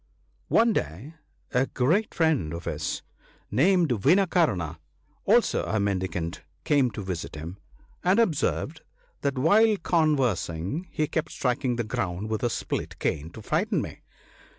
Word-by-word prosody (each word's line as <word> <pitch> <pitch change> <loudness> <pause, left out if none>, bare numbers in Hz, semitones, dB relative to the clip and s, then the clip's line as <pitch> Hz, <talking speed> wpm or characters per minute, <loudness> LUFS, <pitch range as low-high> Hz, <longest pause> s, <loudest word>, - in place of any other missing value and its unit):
One 230 0 +4
day 95 - -3 0.4
a 130 +1 +2
great 165 - +1
friend 150 - +1
or 85 - -5
his, - - -3 0.5
named 170 - +4
Vinakarna, 130 - +2 0.5
also - - +3
a 110 - 0
mendicant, 95 -4 -2 0.2
came 140 -4 +3
to 105 - -5
visit 90 -4 -5
him; 85 +6 -7 0.4
and 185 +3 +3
observed 160 -5 0 0.4
that 140 -1 -1
while 210 +10 +5
conversing, 140 - 0
he 155 - 0
kept 160 +1 -2
striking 125 0 0
the 120 - -1
ground 100 -1 -3
with 110 - -1
a 120 - +1
split - - -3
cane, 80 +1 -2
to 110 - -10
frighten 185 - +1
me. - - -6
130 Hz, 135 wpm, -26 LUFS, -, 0.5 s, while